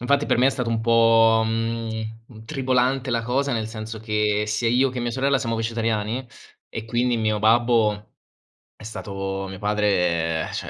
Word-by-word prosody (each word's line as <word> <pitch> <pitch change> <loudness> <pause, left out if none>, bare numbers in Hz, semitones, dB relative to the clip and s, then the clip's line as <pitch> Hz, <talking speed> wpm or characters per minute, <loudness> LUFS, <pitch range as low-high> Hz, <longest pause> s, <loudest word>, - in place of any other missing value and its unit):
Infatti 140 +4 +1
per - - +2
me 125 +2 +4
è - - +5
stato 125 -3 -2
un 115 -1 0
po', 115 -1 +4
mhmm, 115 0 -2
gn 110 0 -5
mhmm, 110 -2 -14
tribolante 130 +1 0
la 115 -1 0
cosa, 135 +4 0
nel 110 -2 -2
senso 110 0 -7
che 105 -1 0
sia 110 +2 0
io 125 +3 +3
che 125 - -6
mia 120 -1 -2
sorella 135 +2 +1
siamo 115 -3 -2
vegetariani, 115 +1 -2 0.4
e 110 - -6
quindi 120 +1 0
mio 110 -1 0
babbo 110 -1 +2 0.6
è - - -15
stato 95 -3 -5
mio 95 - -8
padre, 90 -6 0
ehm, - - -8
cioè, - - -5
115 Hz, 185 wpm, -23 LUFS, 105-120 Hz, 0.6 s, è